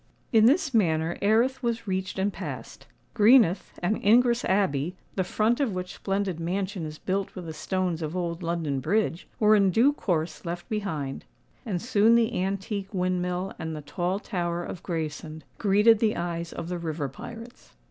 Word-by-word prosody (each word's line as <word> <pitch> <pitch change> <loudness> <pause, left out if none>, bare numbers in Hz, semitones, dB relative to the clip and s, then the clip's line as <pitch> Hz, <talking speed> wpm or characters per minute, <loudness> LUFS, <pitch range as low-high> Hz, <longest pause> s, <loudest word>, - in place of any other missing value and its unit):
In 220 0 +7
this 290 +1 +3
manner 165 -6 +2
Erith 235 +6 +2
was 235 -2 -2
reached 190 0 -2
and 195 +1 0
passed:—Greenhithe 215 -4 +1
and 210 +5 0
Ingress 235 +3 +4
Abbey, 180 -4 +1 0.2
the 190 - 0
front 220 +7 +1
of 265 -8 +1
which 180 0 -4
splendid 195 -3 -2
mansion 185 0 -2
is 155 0 -8
built 195 +3 -2
with 180 - -7
the 160 - -6
stones 180 +1 -2
of 160 +3 -3
old 170 -1 -3
London 165 -5 -1
Bridge, 195 +3 0
were 215 0 +6
in 200 -2 +4
due 240 +10 +4
course 170 - -2
left 175 0 -5
behind;—and 185 - -5
soon 230 -1 +4
the 230 -4 +2
antique 195 +1 -3
windmill 180 0 -1
and 160 0 -4
the 150 - -6
tall 175 +6 -2
tower 175 -4 -2
of 175 - -7
Gravesend 160 -2 -4 0.2
greeted 210 +2 +5
the 220 -1 +2
eyes 170 -1 -3
of 165 - -6
the 175 0 -3
river 160 -3 -3
pirates. 230 - -11
185 Hz, 165 wpm, -27 LUFS, 170-215 Hz, 0.2 s, In